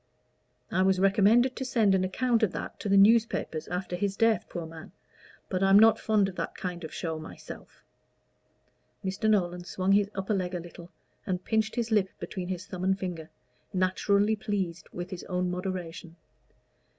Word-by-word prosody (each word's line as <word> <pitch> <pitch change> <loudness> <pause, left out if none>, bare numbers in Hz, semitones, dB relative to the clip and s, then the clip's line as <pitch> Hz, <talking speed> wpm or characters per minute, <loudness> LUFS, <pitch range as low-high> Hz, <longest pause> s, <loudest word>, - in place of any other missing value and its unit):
I 185 - +2
was 190 0 +3
recommended 210 +6 +4
to 265 - -4
send 225 -6 +2
an 190 -1 +2
account 235 +5 +1
of 215 -5 +2
that - - -6
to 205 - -4
the 200 - +5
newspapers 215 -6 +3
after 180 0 -3
his 195 +2 -2
death, 225 -3 +2
poor 170 -1 -5
man! 160 +2 -11 0.5
but 185 -1 -2
I'm 195 0 +6
not 220 +1 +6
fond 210 -3 +2
of 190 - -7
that - - -4
kind 180 -1 -5
of 160 - -6
show 160 -2 -4
myself." 155 - -11 1.2
Mr. 195 +3 0
Nolan 180 -4 +1
swung 185 +1 -1
his 200 0 +4
upper 195 +2 -1
leg 185 -2 -2
a - - -2
little, 170 0 -11 0.4
and 180 -2 -2
pinched 220 0 0
his 235 -2 -2
lip 205 -3 +3
between 180 -2 -5
his 185 0 -4
thumb 185 -2 -7
and 190 +1 +2
finger, 175 -4 -5 0.4
naturally 200 +3 +2
pleased 190 -6 -3
with 175 +1 -6
his 185 - -6
own 180 -1 -1
moderation. 180 -2 -5
190 Hz, 175 wpm, -28 LUFS, 180-205 Hz, 1.2 s, I'm